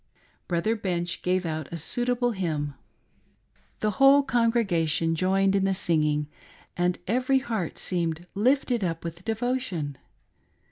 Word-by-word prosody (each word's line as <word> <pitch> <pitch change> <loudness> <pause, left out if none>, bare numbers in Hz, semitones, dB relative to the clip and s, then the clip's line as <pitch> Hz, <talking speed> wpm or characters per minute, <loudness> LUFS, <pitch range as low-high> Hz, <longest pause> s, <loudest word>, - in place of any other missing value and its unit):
Brother 180 +6 +1
Bench 175 -4 -2
gave 180 0 0
out 155 -2 -4
a 170 - -4
suitable 245 +8 0
hymn. 155 -8 -2 1.1
The 215 - +1
whole 275 +1 +7
congregation 195 - +1
.joined 195 +3 +2
in 195 - +2
the 195 0 +2
singing, 150 -5 +1 0.5
and 175 0 +1
every 255 +5 +2
heart 225 -10 -3
seemed 170 -2 -2
lifted 245 +1 +2
up 165 -2 -2
with 170 +1 -7
devotion. 220 - -2
185 Hz, 125 wpm, -26 LUFS, 165-235 Hz, 1.1 s, whole